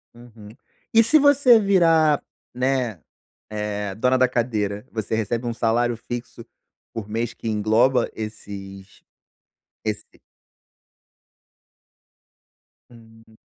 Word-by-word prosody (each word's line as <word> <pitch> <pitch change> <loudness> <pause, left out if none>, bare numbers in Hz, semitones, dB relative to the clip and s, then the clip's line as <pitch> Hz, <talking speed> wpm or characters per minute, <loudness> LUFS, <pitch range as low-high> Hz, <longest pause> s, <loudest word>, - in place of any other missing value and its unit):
Uhum. 115 -3 -14 0.4
E 225 0 +7
se 305 +8 +5
você 285 -5 +6
virar, 165 -7 +3 0.3
né, 125 -6 -1 0.5
eh, 105 -2 -4
dona 125 +4 +2
da 130 0 +4
cadeira? 110 -3 -2
Você 110 0 -3
recebe 115 +2 -2
um 120 - -2
salário 120 0 0
fixo 120 +1 -7 0.5
por 105 -2 -6
mês 115 +2 -2
que 115 - -8
engloba 110 +4 +2
esses 100 -3 -9 0.8
esse 105 -1 -3 2.9
Hum. 115 -1 -19
115 Hz, 100 wpm, -23 LUFS, 105-130 Hz, 2.9 s, E